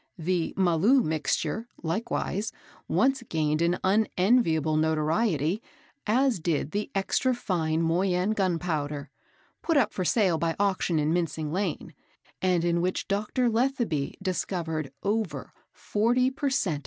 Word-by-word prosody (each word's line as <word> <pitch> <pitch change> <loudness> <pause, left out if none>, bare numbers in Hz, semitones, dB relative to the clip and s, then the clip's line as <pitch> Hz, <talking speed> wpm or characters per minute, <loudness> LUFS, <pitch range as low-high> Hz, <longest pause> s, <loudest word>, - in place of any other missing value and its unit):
The 175 0 -1
"Maloo 190 +8 +4
Mixture," 160 +8 -1 0.2
likewise, 210 +3 -2 0.4
once 270 0 +2
gained 155 -1 0
an 170 +1 +2
unenviable 185 - +2
notoriety, 160 - +1 0.5
as 250 0 +2
did 155 -2 -1
the 205 +1 -2
"Extra 250 +6 +1
Fine 165 -7 -1
Moyune 180 +4 +1
Gunpowder" 155 -7 -2 0.5
put 330 -3 +1
up 225 -6 +2
for 185 - -2
sale 180 -4 +2
by 165 0 0
auction 190 -4 +1
in 155 +1 +1
Mincing 160 -3 -1
Lane, 185 -3 -2 0.5
and 180 -2 +2
in 170 0 +1
which 185 +1 -1
Dr. 210 +5 0
Letheby 230 - 0
discovered 165 -6 -2
over 200 -9 -2 0.2
40 245 +5 +1
per 275 +1 -1
cent. 180 - 0
180 Hz, 125 wpm, -27 LUFS, 160-220 Hz, 0.5 s, Maloo